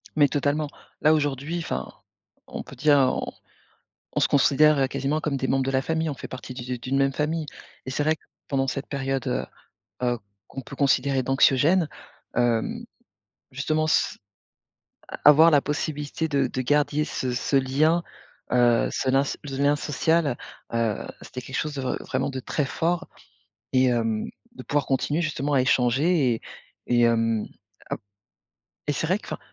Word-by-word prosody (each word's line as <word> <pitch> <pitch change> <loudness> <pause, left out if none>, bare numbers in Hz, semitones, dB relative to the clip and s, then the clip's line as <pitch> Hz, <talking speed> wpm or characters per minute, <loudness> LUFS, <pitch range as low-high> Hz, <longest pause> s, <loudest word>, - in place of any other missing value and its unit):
Mais 145 -2 +5
totalement. 145 +1 0 0.3
Là, 155 - +5
aujourd'hui, 145 +2 -1
enfin, 165 - -4 0.6
on - - -6
peut - - -12
dire, 150 -2 +4
on 130 -1 +1 0.8
on - - 0
se - - +4
considère 140 0 +4
quasiment 140 +3 -1
comme 145 -3 -1
des 130 - -2
membres 135 0 +2
de - - 0
la 130 0 +1
famille. 160 +1 -1
On 145 - -3
fait - - -8
partie 130 0 -8
du 125 - -6
du 125 -1 -4
d'une 130 +3 -1
même 135 0 +2
famille. 155 +3 -1 0.4
Et 130 - -4
c'est 145 - 0
vrai 155 +1 +2
que - - -30 0.2
pendant 135 -1 0
cette 135 +1 -3
période, 135 -2 -2
heu, - - -1 0.6
heu, 120 -1 +1 0.3
qu'on 135 - -7
peut 140 - -10
considérer 135 -1 +2
d'anxiogène, 145 +6 +3 0.5
hem, 120 -2 0 0.7
justement, 155 +4 0
c - - +2 1.1
avoir 155 +3 +8
la 145 -2 +5
possibilité 150 +1 -2
de 140 -3 +1
de 130 - -3
garder 150 +2 +1
ce 130 -4 -3
ce 125 +3 -1
lien, 145 +6 +2 0.5
heu, 120 -1 +4
ce 130 - -1
lin 135 +1 +4
ce - - -4
le 135 -2 -5
lien 145 +1 +3
social, 150 -1 +1 0.4
heu, 115 -3 0 0.2
c'était 125 - -7
quelque 130 +2 -8
chose 150 -1 -3
de 135 - -3
re 130 - -1
vraiment 130 +2 -2
de 130 - -4
très 145 +3 -1
fort 170 +5 -1 0.6
et, 130 0 +4
hem, 115 -3 0 0.3
de - - -9
pouvoir 145 -1 0
continuer, 145 +4 0
justement, 150 -3 -1
à 135 - +4
échanger 130 +3 +3
et - - -9 0.5
et 120 -1 +3
hem, 115 -2 +2 0.4
ap - - -3 0.9
et - - +2
c'est 160 - -2
vrai 185 +4 +2
que - - -15
enfin - - -5
140 Hz, 175 wpm, -25 LUFS, 130-150 Hz, 1.1 s, avoir